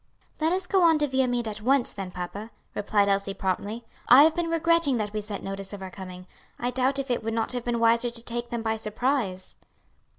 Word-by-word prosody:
"Let 320 +1 +2
us 370 +1 0
go 380 +1 +2
on 330 -2 +5
to 295 -1 +1
Viamede 250 -3 0
at 210 -1 -5
once 265 +2 +2
then, 195 -2 -5
papa," 180 +4 -6 0.2
replied 205 0 +1
Elsie, 200 0 0
promptly. 205 +5 -3 0.2
"I 265 +4 +10
have 315 +1 +5
been 345 -1 -1
regretting 330 -4 +3
that 210 -2 -3
we 215 - -2
sent 205 -1 -6
notice 195 0 -5
of 195 -1 -7
our 190 - -7
coming. 185 -1 -9 0.3
I 245 +1 -2
doubt 260 +2 +1
if 275 -2 -2
it 240 - -1
would 225 0 -2
not 225 -1 -1
have 245 -1 -3
been 240 -1 0
wiser 230 +1 +3
to 235 -1 -7
take 240 0 -4
them 235 -2 -3
by 220 -1 0
surprise." 215 -3 -2
230 Hz, 225 wpm, -26 LUFS, 205-265 Hz, 0.3 s, I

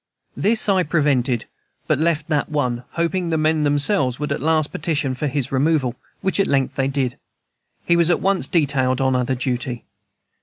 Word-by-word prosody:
This 220 +1 +2
I 195 -2 +3
prevented, 140 -7 +1 0.4
but - - +1
left 160 -1 0
that 150 -2 0
one, 125 -5 -1
hoping 170 +1 -1
the 160 - 0
men 155 0 +1
themselves 145 - +2
would 150 - -3
at - - -2
last 155 -1 +1
petition 150 -4 -1
for 140 +4 -3
his 135 -2 -3
removal, 135 -2 +1 0.3
which 190 +1 -1
at 195 - +3
length 135 -2 +1
they 135 -1 0
did. 135 -3 -2 0.7
He 170 - +3
was 170 -1 +3
at 175 - +2
once 195 0 0
detailed 135 -6 +1
on 130 -1 +1
other 125 +1 0
duty. 125 -1 -3
145 Hz, 180 wpm, -21 LUFS, 130-165 Hz, 0.7 s, I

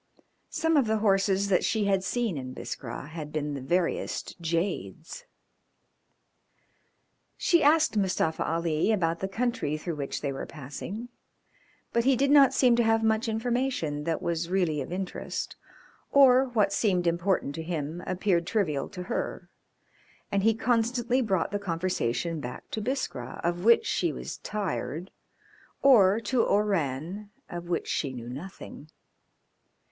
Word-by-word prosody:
Some 325 -1 +1
of 265 -5 +3
the 220 0 +2
horses 195 -1 +2
that 190 - +3
she 220 -2 +1
had 195 -2 +2
seen 230 -2 -1
in 130 -2 -5
Biskra 130 +3 -6
had 155 -2 -7
been 150 -1 -2
the 140 - -5
veriest 170 +6 -1
jades. 170 - -3 2.1
She 340 -3 +3
asked 305 -3 +4
Mustafa 185 -5 +1
Ali 165 +3 0
about 170 -5 +1
the 190 - -2
country 220 -7 -1
through 160 0 -5
which 140 -1 -4
they 140 -2 -2
were 135 - -5
passing, 180 - -7 0.8
but 235 - +2
he 265 +1 +4
did 275 +3 +2
not 280 -3 +7
seem 250 -3 +4
to 240 - +4
have 225 0 +2
much 220 +1 +2
information 225 - -1
that 165 -1 -1
was 170 0 -1
really 175 -6 +1
of 135 - -6
interest, 185 +1 -4 0.6
or 265 -2 +7
what 220 -6 +1
seemed 185 -5 +1
important 170 -3 +1
to 160 - -5
him 160 0 -4
appeared 180 -2 +1
trivial 170 -11 0
to 180 -3 -7
her, - - -4 0.8
and 200 - +2
he 225 +2 +3
constantly 240 +2 +1
brought 195 -8 0
the 205 - -1
conversation 165 -4 -1
back 125 -3 -7
to 220 - -3
Biskra, 205 - -3
of 175 +1 -1
which 235 - +5
she - - 0
was - - -6
tired, 180 -5 -4 0.7
or 215 -7 +6
to 235 +2 +1
Oran, 195 -1 0 0.2
of 175 0 -6
which 170 - -1
she 140 -4 -1
knew 120 -1 -7
nothing. 150 +1 -9
190 Hz, 145 wpm, -28 LUFS, 160-225 Hz, 2.1 s, not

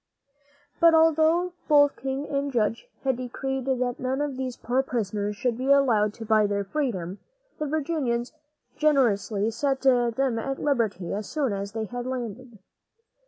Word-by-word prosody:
But 335 -1 +6
although 325 +2 +3
both 290 -2 +5
king 270 +2 -4
and 280 0 -1
judge 230 -1 0 0.2
had 265 -2 +1
decreed 265 +1 -4
that 250 -2 -1
none 260 +1 -1
of 290 -2 -2
these 255 -1 -4
poor 250 +3 0
prisoners 210 -5 -2
should 240 +2 -1
be 265 +2 +1
allowed 225 -7 +3
to 225 - -8
buy 215 -1 +4
their 200 0 -1
freedom, 195 - -3 0.4
the 305 - -1
Virginians 275 -6 -1 0.4
generously 230 -8 +2
set 270 +3 -1
them 245 -1 +2
at 270 +3 -3
liberty 220 -10 0
as 210 +1 -4
soon 280 -8 -1
as 200 +1 -4
they 220 -1 -2
landed. 245 -1 -5
255 Hz, 150 wpm, -26 LUFS, 220-275 Hz, 0.4 s, But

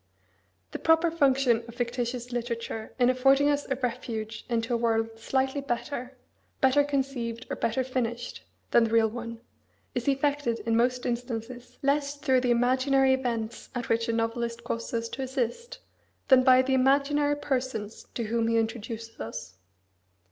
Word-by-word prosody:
The - - -5
proper 325 +1 +4
function 270 -6 +3
of 235 - -11
fictitious 245 0 -3
literature 230 -2 -4
in 250 0 +4
affording 270 +3 +4
us 290 0 -1
a 265 - +1
refuge 230 -3 -4
into 230 +1 0
a - - +3
world 225 -1 +1
slightly 265 +4 0
better 250 0 -4 0.4
better 265 +2 +4
conceived, 260 -5 -2
or - - -1
better 230 +3 0
finished 240 -2 -3 0.3
than 235 - +5
the - - -2
real 225 0 +4
one, 230 0 -7 0.5
is 245 +1 -3
effected 280 -3 +1
in 230 -1 +2
most 250 +2 +1
instances 240 0 -4
less 280 +1 +1
through 265 -3 +2
the 250 - 0
imaginary 260 +2 +3
events 235 -3 -3
at 245 -1 -3
which 230 0 +1
a - - +3
novelist 230 +1 -2
causes 230 0 -4
us 230 - -5
to 270 - -5
assist, 265 - -3 0.5
than 260 -2 +8
by 255 0 +6
the 265 +1 0
imaginary 285 +2 +3
persons 255 -7 -3
to 235 - -1
whom 225 +1 0
he 230 0 +2
introduces 225 0 -3
us. 115 -4 -7
245 Hz, 155 wpm, -28 LUFS, 230-270 Hz, 0.5 s, than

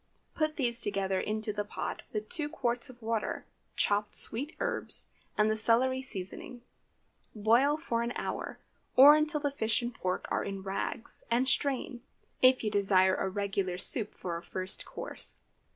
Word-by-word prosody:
Put 310 -1 0
these 240 -4 +1
together 195 -2 0
into 215 0 -2
the 205 0 -1
pot, 205 - -5
with 215 0 -3
two 300 -4 -2
quarts 245 -6 -1
of 250 -1 -13
water, 225 -1 -2 0.3
chopped 205 0 +2
sweet 280 +7 -1
herbs, - - 0 0.3
and 210 - +4
the 215 - +2
celery 245 +4 +3
seasoning. 235 +1 -6 0.7
Boil 235 +8 +4
for 235 -7 -1
an 235 +1 -1
hour, - - -4 0.4
or 285 +3 +10
until 305 -1 +1
fish 225 -3 +1
and 240 +1 -3
pork 185 -4 -2
are - - +1
in 195 -1 -5
rags, 195 +3 -3
and 240 +3 +2
strain, 260 -2 0 0.4
if 255 -1 +6
you 215 - 0
desire 195 -2 +4
a 190 - -1
regular 195 -2 -1
soup 210 +3 0
for 170 -2 -4
a - - -7
first 185 +2 -5
course. - - -6
225 Hz, 160 wpm, -31 LUFS, 200-255 Hz, 0.7 s, or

